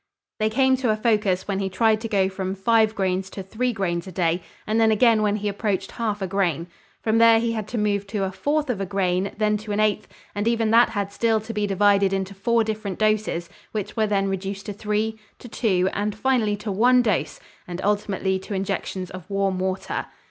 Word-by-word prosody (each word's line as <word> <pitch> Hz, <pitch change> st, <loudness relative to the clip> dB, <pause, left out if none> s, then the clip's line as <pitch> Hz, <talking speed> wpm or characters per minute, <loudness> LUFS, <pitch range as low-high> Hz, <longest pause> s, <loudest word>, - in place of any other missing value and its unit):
They 215 Hz, 0 st, +2 dB
came 265 Hz, +3 st, +3 dB
to 255 Hz, -3 st, -1 dB
a 215 Hz, -, +3 dB
focus 210 Hz, -5 st, +1 dB
when 195 Hz, -1 st, -1 dB
he 195 Hz, -1 st, -1 dB
tried 220 Hz, +2 st, +2 dB
to 225 Hz, -, -3 dB
go 195 Hz, -4 st, +2 dB
from 190 Hz, 0 st, -4 dB
five 220 Hz, +2 st, +3 dB
grains 190 Hz, -1 st, -1 dB
to 195 Hz, -, -7 dB
three 245 Hz, +6 st, -1 dB
grains 185 Hz, -4 st, -2 dB
a -, -, -7 dB
day 175 Hz, 0 st, 0 dB, 0.2 s
and 220 Hz, +1 st, +1 dB
then 225 Hz, -, +5 dB
again 220 Hz, 0 st, +4 dB
when 210 Hz, -1 st, +2 dB
he 210 Hz, 0 st, -3 dB
approached 200 Hz, -1 st, -2 dB
half 210 Hz, -4 st, -2 dB
a -, -, -1 dB
grain. 175 Hz, -4 st, 0 dB, 0.4 s
From 225 Hz, 0 st, +2 dB
there 230 Hz, 0 st, +7 dB
he 230 Hz, 0 st, 0 dB
had 215 Hz, -2 st, -3 dB
to 240 Hz, -, -4 dB
move 205 Hz, -2 st, 0 dB
to 200 Hz, -1 st, -2 dB
a 190 Hz, -, -1 dB
fourth 290 Hz, +8 st, 0 dB
of 205 Hz, -5 st, -4 dB
a -, -, -1 dB
grain, 190 Hz, 0 st, 0 dB
then 210 Hz, -1 st, +2 dB
to 210 Hz, 0 st, -7 dB
an 205 Hz, -, -1 dB
eighth, 215 Hz, 0 st, +1 dB, 0.3 s
and 205 Hz, +2 st, -2 dB
even 230 Hz, -2 st, +1 dB
that 235 Hz, +1 st, +6 dB
had 200 Hz, -2 st, -3 dB
still 225 Hz, +1 st, +1 dB
to 225 Hz, +2 st, -7 dB
be 210 Hz, -1 st, 0 dB
divided 200 Hz, 0 st, +3 dB
into 195 Hz, 0 st, -2 dB
four 230 Hz, +4 st, +1 dB
different 215 Hz, -3 st, -4 dB
doses 215 Hz, -5 st, 0 dB, 0.3 s
which 210 Hz, -2 st, -4 dB
were 220 Hz, -2 st, +2 dB
then 195 Hz, -1 st, +1 dB
reduced 195 Hz, +1 st, -4 dB
to 205 Hz, -, -4 dB
three, 215 Hz, +2 st, -2 dB, 0.2 s
to -, -, -11 dB
two, 190 Hz, -6 st, +1 dB
and 205 Hz, 0 st, -2 dB
finally 220 Hz, -3 st, +1 dB
to 210 Hz, 0 st, -5 dB
one 245 Hz, +5 st, +4 dB
dose 215 Hz, -6 st, -1 dB, 0.3 s
and 175 Hz, 0 st, -6 dB
ultimately 200 Hz, -2 st, 0 dB
to 195 Hz, +2 st, -6 dB
injections 190 Hz, -1 st, -3 dB
of 185 Hz, 0 st, -10 dB
warm 195 Hz, -2 st, 0 dB
water. 190 Hz, 0 st, -2 dB
205 Hz, 220 wpm, -23 LUFS, 195-220 Hz, 0.4 s, there